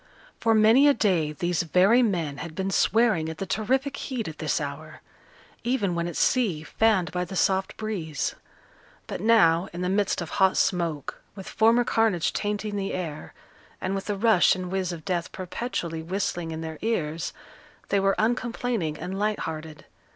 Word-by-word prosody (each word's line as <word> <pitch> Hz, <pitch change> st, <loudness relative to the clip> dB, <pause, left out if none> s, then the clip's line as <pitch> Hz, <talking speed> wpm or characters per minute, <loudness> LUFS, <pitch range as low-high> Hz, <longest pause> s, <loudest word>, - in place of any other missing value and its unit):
For 225 Hz, -1 st, +3 dB
many 225 Hz, +6 st, +6 dB
a 285 Hz, -, +5 dB
day 180 Hz, -9 st, +1 dB
these 175 Hz, +2 st, -1 dB
very 185 Hz, +8 st, +4 dB
men 170 Hz, -, 0 dB
had 160 Hz, +1 st, -7 dB
been 190 Hz, 0 st, -2 dB
swearing 215 Hz, -8 st, +2 dB
at 160 Hz, -, -6 dB
the 195 Hz, -, -4 dB
terrific 265 Hz, +8 st, 0 dB
heat 250 Hz, -5 st, -4 dB
at 155 Hz, -1 st, -8 dB
this 155 Hz, -3 st, 0 dB
hour 150 Hz, +1 st, -7 dB, 0.6 s
even 230 Hz, -7 st, 0 dB
when 170 Hz, 0 st, -1 dB
at 175 Hz, -, -6 dB
sea, 200 Hz, -12 st, +1 dB
fanned 205 Hz, 0 st, +1 dB
by 180 Hz, 0 st, -1 dB
the 180 Hz, +2 st, -7 dB
soft 190 Hz, +1 st, +1 dB
breeze; 185 Hz, -9 st, -3 dB, 0.7 s
but -, -, -6 dB
now, 185 Hz, -6 st, +4 dB
in 175 Hz, -, -5 dB
the 180 Hz, -, 0 dB
midst 200 Hz, 0 st, +1 dB
of 170 Hz, -, -5 dB
hot 190 Hz, -1 st, +3 dB
smoke, 165 Hz, -6 st, -1 dB
with 195 Hz, -2 st, -9 dB
former 230 Hz, +2 st, +3 dB
carnage 220 Hz, -8 st, +1 dB
tainting 210 Hz, 0 st, -2 dB
the 195 Hz, 0 st, -2 dB
air, 160 Hz, -5 st, -6 dB, 0.4 s
and 185 Hz, -, -2 dB
with 195 Hz, 0 st, -3 dB
the 205 Hz, -1 st, -2 dB
rush 220 Hz, -4 st, +4 dB
and 185 Hz, -1 st, -5 dB
whizz 190 Hz, -2 st, -1 dB
of 165 Hz, -2 st, -8 dB
death 175 Hz, -3 st, -2 dB
perpetually 180 Hz, -4 st, -4 dB
whistling 175 Hz, -1 st, -2 dB
in 160 Hz, 0 st, -5 dB
their 160 Hz, -1 st, -6 dB
ears, 165 Hz, -8 st, -2 dB, 0.6 s
they 200 Hz, -, +2 dB
were 195 Hz, 0 st, +2 dB
uncomplaining 230 Hz, -7 st, -1 dB
and 190 Hz, +4 st, -5 dB
light 210 Hz, 0 st, 0 dB
hearted. 155 Hz, -1 st, -6 dB
190 Hz, 175 wpm, -26 LUFS, 165-215 Hz, 0.7 s, many